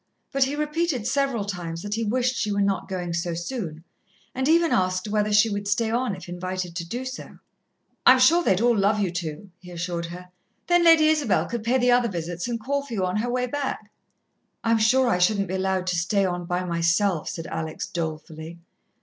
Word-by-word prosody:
But 275 -1 +3
he 275 +2 -3
repeated 300 -4 -1
several 270 -6 0
times 175 -4 -5
that 205 0 -4
he 225 +1 -1
wished 250 +3 0
she 210 - -1
were 200 - 0
not 195 0 -1
going 180 -2 -3
so 170 0 -2
soon, 175 -4 -5 0.5
and 260 +1 -1
even 335 0 +4
asked 185 +1 +1
whether 210 0 0
she 210 +2 +5
would 205 -1 -3
stay 220 +2 +1
on 240 -3 0
if 185 - -11
invited 180 0 -4
to 170 - -3
do 240 +10 -5
so. 260 +1 -8 0.7
"I'm 255 - +8
sure 320 +8 +5
they'd 190 - +2
all 240 0 +4
love 205 +1 +2
you 195 -4 0
to," 170 +2 -6
he 180 -1 -13
assured 170 -1 -4
her. 180 +1 -10 0.4
"Then 350 0 +3
Lady 330 -2 +7
Isabel 295 -9 +2
could 235 -1 -4
pay 240 +3 +2
the 245 -1 +3
other 245 -1 +3
visits 175 0 -4
and 235 -1 -2
call 280 +5 -2
for 280 - -9
you 190 -3 0
on 180 +2 -1
her 235 +3 -1
way 250 0 0
back." 280 +2 -4 0.7
"I'm 230 0 +2
sure 255 +4 +4
I 180 -7 +2
shouldn't 200 +2 +2
be - - -3
allowed 190 -1 0
to 180 -1 0
stay 190 +4 +1
on 175 -1 -2
by 180 +1 -1
myself," 170 +1 +1
said 165 - -6
Alex 160 -1 -4
dolefully. 160 0 -6
200 Hz, 210 wpm, -24 LUFS, 175-245 Hz, 0.7 s, I'm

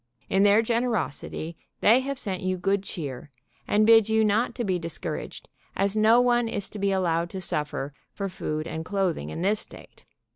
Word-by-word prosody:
In 195 - +3
their 205 +2 +5
generosity 220 - -2 0.2
they 230 +4 +5
have 275 +1 -3
sent 190 -6 -2
you 185 0 -1
good 195 +2 +1
cheer, 145 -8 -6 0.4
and 210 +1 +3
bid 225 -1 +6
you 220 0 +3
not 215 +4 +1
to 240 - -2
be 185 -4 0
dis 165 -1 -4
couraged, 165 -4 -6 0.3
as 200 +1 +1
no 220 +2 +5
one 240 -1 +3
is 205 -3 -3
to 210 - -7
be 200 0 +1
allowed 170 -3 0
to 190 - -6
suffer 150 -5 -3 0.2
for 200 - -4
food 155 -4 -4
and 160 -1 -5
clothing 185 - -1
in 120 - -5
this 205 +2 +2
state. - - -12
195 Hz, 190 wpm, -26 LUFS, 170-220 Hz, 0.4 s, bid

